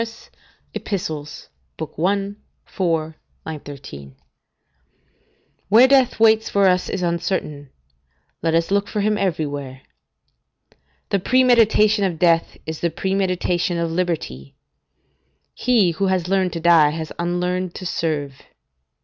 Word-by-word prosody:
Ep., - - -7
i. 155 - -4 0.5
4, 160 -4 -2 0.3
13.] 140 - -9 1.5
Where 230 +6 +7
death 265 -4 +3
waits 220 0 +4
for 200 -1 +3
us 180 -1 +1
is 190 - -3
uncertain; 170 -4 -2 0.7
let 165 0 +1
us 165 +2 0
look 200 0 +1
for 210 - -2
him 210 +1 +1
everywhere. 145 -8 -3 1.3
The 200 - +1
premeditation 220 -2 +4
of 180 -4 -1
death 165 0 +2
is 160 -1 -5
the 170 - 0
premeditation 180 -2 -1
of 170 -1 -1
liberty; 165 - -3 1.0
he 225 -8 +2
who 195 +4 -1
has 185 -2 0
learned 190 -1 +1
to 165 - -3
die 165 -3 +5
has 160 0 -5
unlearned 180 +1 -2
to 185 - -7
serve. 145 -6 -3
175 Hz, 115 wpm, -21 LUFS, 155-195 Hz, 1.5 s, Where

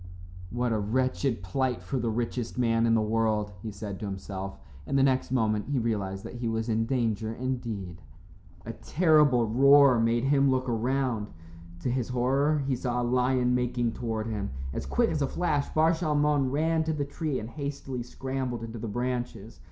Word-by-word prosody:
"What 120 +3 -1
a 110 - +1
wretched 130 +1 0
plight 125 +1 -1
for 125 +9 -2
the 120 -1 -1
richest 120 +1 -3
man 115 -2 +2
in 115 - +4
the 110 - +2
world," 110 -1 0
he 110 - -5
said 100 -1 -6
to 105 - -4
himself, 95 -2 -6 0.3
and 140 - +1
the 135 - +4
next 130 -2 +1
moment 110 -4 +1
he 145 - 0
realized 100 -5 -2
that - - -8
he 120 -1 -3
was 115 +1 -1
in 115 0 +1
danger 115 -4 0
indeed. 115 -9 -4 0.6
A - - -5
terrible 150 -8 +3
roar 135 +2 +6
made 115 +1 +2
him 140 0 +3
look 130 0 +1
around. 120 -1 0 0.5
To 125 - -1
his 125 -1 -1
horror 135 +4 +1
he 135 -1 +1
saw 125 0 -2
a - - 0
lion 125 0 +2
making 125 -1 0
toward 110 -2 -3
him. 105 -3 -3 0.2
As 70 - -4
quick 65 0 +2
as 150 - -1
a 140 - +2
flash 150 -4 0
Bar 160 +1 +4
Shalmon 150 -4 +1
ran 160 +3 +1
to 160 - 0
the 145 -2 -2
tree 145 -1 -3
and 110 +2 -7
hastily 140 -3 -5
scrambled 130 -1 -4
into 115 0 -6
the 115 - -4
branches. 120 -1 -4
125 Hz, 185 wpm, -28 LUFS, 110-135 Hz, 0.6 s, roar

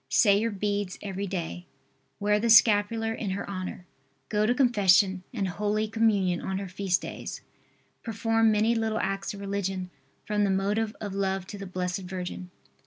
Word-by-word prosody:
Say 200 -3 +5
your 230 +2 0
beads 205 -2 -2
every 200 0 -4
day. 180 -1 -5 0.5
Wear 210 0 +2
the 230 +2 0
scapular 225 0 +5
in 220 -2 -4
her 195 +1 -3
honor. 185 -2 -5 0.4
Go 210 0 +1
to 245 - +2
Confession 200 -7 +4
and 205 -7 -2
Holy 210 +4 -1
Communion 205 -5 +1
on 190 - -3
her 195 0 -4
feast 185 0 -1
days. - - -6 0.6
Perform 225 0 +2
many 215 +2 +3
little 225 -1 0
acts 195 0 -2
of - - -9
religion 195 -2 -3 0.3
from 210 0 +1
the 200 - +2
motive 205 +3 0
of 205 -2 -5
love 195 -1 -1
to 205 - -8
the 195 - -6
Blessed 180 0 -2
Virgin. 180 -1 -6
200 Hz, 170 wpm, -27 LUFS, 190-215 Hz, 0.6 s, Say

